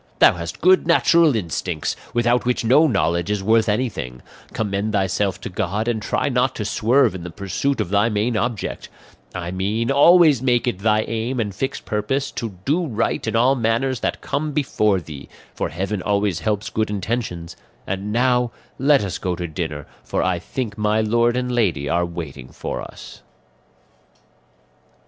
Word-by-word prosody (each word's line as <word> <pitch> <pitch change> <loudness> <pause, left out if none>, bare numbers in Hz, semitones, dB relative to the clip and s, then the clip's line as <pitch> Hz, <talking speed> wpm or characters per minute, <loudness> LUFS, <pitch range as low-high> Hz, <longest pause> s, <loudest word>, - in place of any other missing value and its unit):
Thou - - +6
hast 85 -2 -7
good 185 0 +4
natural 170 -3 +4
instincts, 85 -4 -2 0.2
without 120 +1 +2
which 125 -1 0
no 145 +7 +5
knowledge 85 - 0
is 105 -2 -1
worth 110 +2 +3
anything; 105 - -2 0.3
commend 105 0 -2
thyself 95 0 0
to - - -5
God, 105 +3 -2
and 115 -2 0
try - - -1
not - - +1
to - - -3
swerve 120 0 +3
in 95 - -6
the 90 - -6
pursuit 100 +10 -2
of - - -1
thy 105 +3 +3
main 110 +2 0
object; 115 -2 -3 0.5
I 90 -1 -4
mean, 105 +6 -1
always 155 -1 +6
make 125 -2 +2
it 100 -6 -1
thy 105 +1 +2
aim 115 +4 -3
and 105 -3 -2
fixed 135 +8 -4
purpose 130 +7 -1
to 110 -6 -5
do 165 +4 +1
right 115 -2 -1
in 110 - -1
all 125 +4 +4
matters 120 +1 0
that - - -2
come 150 +1 -2
before 105 -8 +1
thee, 75 -4 -10 0.2
for - - -2
heaven 95 +4 -3
always 100 -3 0
helps 105 +3 -2
good 110 -1 -1
intentions; 100 -4 -3 0.3
and 100 +2 -3
now 125 +1 +2 0.3
let 140 -2 +4
us 95 - -4
go 90 -1 -2
to 85 0 -4
dinner, 80 -3 -4 0.2
for - - -1
I 90 0 0
think 110 +3 -5
my 105 +1 +2
lord 120 +2 +2
and 125 0 -1
lady 100 -12 0
are 85 +3 +1
waiting 80 -7 -7
for - - -5
us." - - -11
110 Hz, 170 wpm, -21 LUFS, 95-125 Hz, 0.5 s, Thou